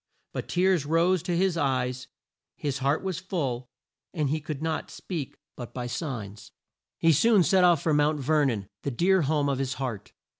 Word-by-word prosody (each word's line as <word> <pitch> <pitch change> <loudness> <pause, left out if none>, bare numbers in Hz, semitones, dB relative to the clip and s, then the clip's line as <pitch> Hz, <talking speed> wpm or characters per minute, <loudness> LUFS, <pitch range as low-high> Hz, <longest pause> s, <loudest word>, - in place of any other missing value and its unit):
But - - -5
tears 180 -3 +2
rose 170 +3 +3
to 175 0 -1
his 185 -1 +1
eyes, 130 -3 -1 0.5
his 140 -2 -3
heart 140 +5 +1
was 190 -3 -2
full, 135 -10 -3 0.5
and 150 -4 0
he 155 0 -1
could 150 -1 -5
not 160 +1 -2
speak 160 -8 -6 0.2
but 120 -2 -9
by 125 -1 -3
signs. 115 - -5 0.5
He 165 - +4
soon 215 - +5
set 185 +1 +4
off 175 -5 +4
for 160 - +2
Mount 150 +1 +2
Ver 150 +2 +2
non, 105 -7 -1
the - - -2
dear 185 +8 +3
home 145 -1 +1
of 135 -2 0
his 135 -2 -2
heart. 115 -7 -5
150 Hz, 185 wpm, -27 LUFS, 130-170 Hz, 0.5 s, soon